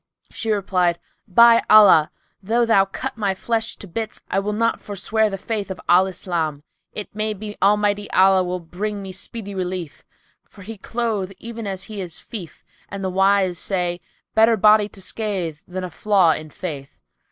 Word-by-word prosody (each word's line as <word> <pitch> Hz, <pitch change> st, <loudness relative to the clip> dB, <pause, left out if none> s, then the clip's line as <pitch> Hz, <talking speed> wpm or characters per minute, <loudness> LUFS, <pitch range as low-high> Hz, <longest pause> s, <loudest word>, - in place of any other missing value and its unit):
She 225 Hz, -, -4 dB
replied, 185 Hz, -4 st, +1 dB, 0.3 s
"By 235 Hz, +4 st, +6 dB
Allah, 200 Hz, -8 st, +7 dB, 0.3 s
though 230 Hz, +5 st, +1 dB
thou 200 Hz, -4 st, +4 dB
cut 235 Hz, +6 st, -6 dB
my 200 Hz, -3 st, 0 dB
flesh 225 Hz, +3 st, -2 dB
to 200 Hz, -, -11 dB
bits 220 Hz, +5 st, -5 dB
I 195 Hz, -, +2 dB
will 205 Hz, +1 st, -2 dB
not 230 Hz, +2 st, 0 dB
forswear 210 Hz, +2 st, -1 dB
the 195 Hz, -, -4 dB
faith 205 Hz, +1 st, -4 dB
of 190 Hz, -, -6 dB
Al 185 Hz, +2 st, +5 dB
Islam! 165 Hz, -5 st, -3 dB, 0.3 s
It 210 Hz, -, -7 dB
may 215 Hz, 0 st, -1 dB
be 210 Hz, +1 st, -7 dB
Almighty 205 Hz, 0 st, +2 dB
Allah 190 Hz, 0 st, +4 dB
will 180 Hz, 0 st, -3 dB
bring 200 Hz, +5 st, -5 dB
me 190 Hz, -, -6 dB
speedy 200 Hz, +2 st, -6 dB
relief, 180 Hz, -4 st, -4 dB, 0.4 s
for 200 Hz, -, -16 dB
He 220 Hz, +1 st, -9 dB
cloth 220 Hz, -4 st, -2 dB
even 230 Hz, 0 st, -7 dB
as 190 Hz, -1 st, -4 dB
He 210 Hz, 0 st, -7 dB
is 175 Hz, -3 st, -8 dB
fief, 180 Hz, -9 st, -9 dB, 0.2 s
and 200 Hz, -1 st, -6 dB
the 190 Hz, -, -1 dB
wise 195 Hz, -1 st, +2 dB
say: 175 Hz, -2 st, -2 dB, 0.3 s
'Better 225 Hz, +1 st, +4 dB
body 210 Hz, 0 st, +5 dB
to 200 Hz, -, -13 dB
scathe 185 Hz, -7 st, -3 dB
than 185 Hz, +1 st, -5 dB
a 180 Hz, -, -5 dB
flaw 190 Hz, -2 st, +3 dB
in 155 Hz, 0 st, -4 dB
faith.'" 145 Hz, -4 st, -7 dB
195 Hz, 175 wpm, -21 LUFS, 180-215 Hz, 0.4 s, Allah